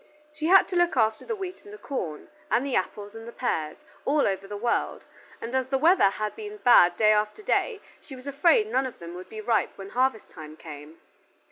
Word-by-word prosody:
She 310 +1 -3
had 385 +2 +6
to 365 - -4
look 350 -5 +2
after 220 -1 +1
the 455 - -3
wheat 375 -3 -7
and 410 - -13
the 420 - -9
corn, 180 - -5 0.2
and 250 - +1
the 275 - -2
apples 205 +2 -3
and 225 0 -10
the - - -7
pears, 160 -12 -2 0.3
all 290 +1 +2
over 195 0 -3
the 205 +1 -6
world, 235 +3 -1 0.3
and 230 +2 -7
as 260 -1 0
the 270 0 0
weather 325 - +5
had 215 +1 -4
been 425 -1 -8
bad 175 - +5
day 215 -1 +5
after 210 - -1
day 425 +1 0 0.2
she 270 - -11
was 255 0 -13
afraid 335 - +3
none 270 -11 0
of 255 - -10
them 170 0 -9
would 185 +1 -10
be 215 -1 -7
ripe 225 0 0
when 195 0 -8
harvest 255 -3 0
time 155 -1 -11
came. 150 0 -11
240 Hz, 225 wpm, -26 LUFS, 200-310 Hz, 0.3 s, had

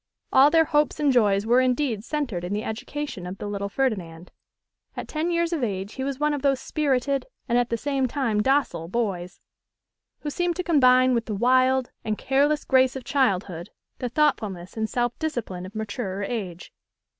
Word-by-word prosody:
All 270 +2 +7
their 325 +1 +4
hopes 295 -1 +1
and 290 -3 +3
joys 205 -4 +3
were 240 +3 +4
indeed 250 -4 0
centred 245 - -3
in 180 +3 -3
the 210 +1 -2
education 245 -3 -5
of 185 +2 -6
the - - -6
little 200 -1 -3
Ferdinand. 185 -9 -2 0.7
At - - -5
ten 315 +2 -2
years 340 0 0
of 305 -6 -1
age 195 -2 -3
he 265 - -4
was 275 0 -3
one 300 0 +1
of 290 - -3
those 275 -2 +2
spirited 275 - 0 0.2
and 240 - +1
at 245 0 +2
the 230 - -1
same 270 +1 0
time 235 -5 0
docile 265 - +1
boys, 185 -4 -3 0.8
who 295 - -4
seem 350 +2 -1
to 365 - -2
combine 255 -6 +5
with 235 -1 0
the 215 - -2
wild 255 +3 +3
and 215 -1 -2
careless 290 +3 +1
grace 260 -1 +3
of 265 - -6
childhood 190 - 0 0.3
the 250 - -2
thoughtfulness 215 - 0
and 220 -1 -2
self 240 -1 -1
discipline 230 - -4
of 200 - -14
maturer 205 -2 -4
age. 195 -6 -5
250 Hz, 185 wpm, -25 LUFS, 205-280 Hz, 0.8 s, All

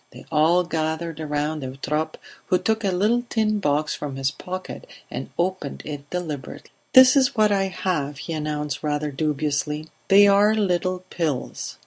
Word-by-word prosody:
They - - -13
all 165 +3 +4
gathered 160 -1 -3
round 150 0 -2
Eutrope, 150 +4 -3 0.3
who 180 - +3
took 220 +3 0
a 200 - +2
little 210 +6 +2
tin 215 -2 +1
box 150 -3 0
from 145 -2 -5
his 135 0 0
pocket 185 - -7 0.2
and - - -5
opened 175 -5 -2
it 145 -1 -7
deliberately. 160 -7 -5 0.2
"This 260 +1 +9
is 265 -2 +3
what 215 -2 +4
I 195 -1 +2
have," 165 -6 -2
he 165 +3 -5
announced 150 -2 -3
rather 150 -1 -1
dubiously. 150 +1 -1 0.2
"They 200 +1 +7
are 205 +2 +5
little 185 -3 0
pills. 155 -7 -3
160 Hz, 155 wpm, -23 LUFS, 150-190 Hz, 0.3 s, This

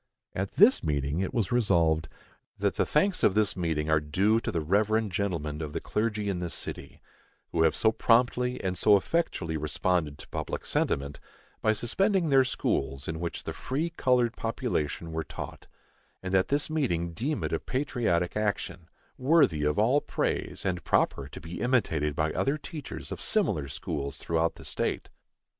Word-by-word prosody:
At 95 +1 -3
this 215 +7 +5
meeting 75 0 -1
it 95 - -1
was 115 -7 -1
Resolved, 85 -9 +2 0.5
That - - +1
the - - +1
thanks 180 +6 +2
of 95 - +4
this 105 -2 +2
meeting 80 -4 -1
are 80 -1 +4
due 95 +10 +2
to - - -3
the 85 - -1
reverend 105 +5 +1
gentlemen 85 -6 -2
of 75 -2 -5
the 80 - -1
clergy 105 +1 -1
in 95 -3 -1
this 85 -1 -3
city, - - -6 0.5
who 85 - +1
have 80 -1 +4
so 110 - +3
promptly 125 +2 +2
and 95 -1 -1
so 105 +3 +5
effectually 95 - -1
responded 75 0 0
to - - -12
public - - -4
sentiment, 70 +1 -1 0.4
by 110 - +3
suspending 185 - +1
their 135 -1 +6
schools 70 - -1
in 80 0 -3
which 85 0 -4
the - - -4
free 155 +6 -2
colored 125 -6 +2
population 115 - -2
were 80 0 -2
taught; - - -8 0.6
and 95 0 -4
that 95 0 +3
this 145 +1 +1
meeting 85 - -1
deem 140 - -2
it - - -2
a - - +1
patriotic 120 -10 -1
action, 105 -5 -2 0.3
worthy 130 - +4
of 75 0 +1
all 125 +7 +4
praise, - - -2
and 90 -2 -1
proper 70 - +1
to - - -9
be 85 +1 -7
imitated 80 - +1
by 80 0 0
other 140 +3 +1
teachers 155 -2 -8
of - - -5
similar 70 -2 +1
schools 70 +1 -4
throughout 85 0 0
the - - -12
state. - - -2
95 Hz, 175 wpm, -28 LUFS, 80-125 Hz, 0.6 s, their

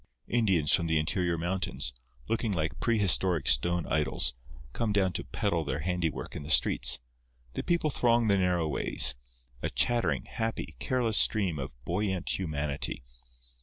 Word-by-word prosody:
Indians 95 -10 +2
from 85 -2 +2
the 80 0 +2
interior 85 +2 0
mountains, 90 -6 -3 0.3
looking 115 -1 -1
like 80 -3 -2
prehistoric 95 - +1
stone 85 +7 +3
idols, 65 -4 +1 0.4
come 115 -2 -1
down 95 -3 +1
to - - -3
peddle 85 -1 -1
their 70 -1 -3
handiwork 90 -2 -3
in - - -5
the 70 - -9
streets. - - +4 0.6
The - - -3
people 170 -3 +1
throng 120 -2 +2
the 100 - +4
narrow 90 -3 +1
ways, 65 -2 +2 0.5
a - - -1
chattering, 85 - +1
happy, 115 - -4
careless 115 - +1
stream 95 -8 +2
of 65 -1 -6
buoyant 95 0 -1
humanity. 75 -8 -3
85 Hz, 145 wpm, -29 LUFS, 75-100 Hz, 0.6 s, streets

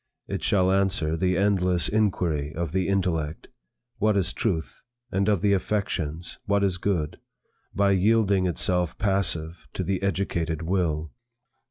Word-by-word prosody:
It - - -3
shall 95 -2 +3
answer 95 -5 +1
the 90 +1 +1
endless 90 -3 +2
inquiry 85 -9 0
of 85 -2 -2
the 95 +1 0
intellect, 85 -6 -1 0.5
What 105 -1 +3
is 95 - +1
truth? 80 - -2 0.3
and 95 +2 +1
of 100 -4 +2
the 100 0 +3
affections, 90 -5 -2
What 100 0 +2
is 95 -2 +1
good? 90 -6 -1 0.6
by 100 0 +3
yielding 100 -1 +3
itself 90 0 0
passive 90 -4 -1
to - - -2
the 95 -1 -1
educated 85 -5 -1
Will. 80 -4 -1
95 Hz, 140 wpm, -26 LUFS, 80-100 Hz, 0.6 s, shall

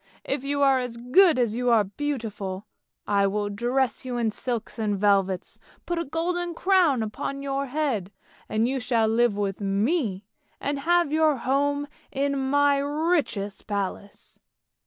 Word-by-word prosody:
If 270 -1 -2
you 285 0 0
are 270 -1 +5
as 245 -2 -5
good 305 +7 +5
as 235 -3 +1
you 245 +1 0
are 225 -3 +5
beautiful, 210 -5 -4 0.4
I 200 -1 +2
will 205 +1 -1
dress 240 +5 0
you 250 -1 -4
in 230 -2 +1
silks 235 0 -4
and 210 -2 0
velvets, 195 -2 +1 0.3
put 345 -1 -2
a 335 - -2
golden 345 +3 -2
crown 345 - +3
upon 275 +6 -4
your 275 0 -2
head, 250 -9 -1 0.4
and 220 +2 +1
you 265 +1 -1
shall 235 -3 +1
live 225 -1 +2
with 200 -1 -2
me 205 - 0 0.3
and 285 0 -2
have 345 +1 +2
your 310 -1 +4
home 285 +3 0 0.2
in 275 -1 -1
my 285 0 +4
richest 285 - -1
palace! 200 -1 -5
250 Hz, 155 wpm, -25 LUFS, 210-285 Hz, 0.4 s, are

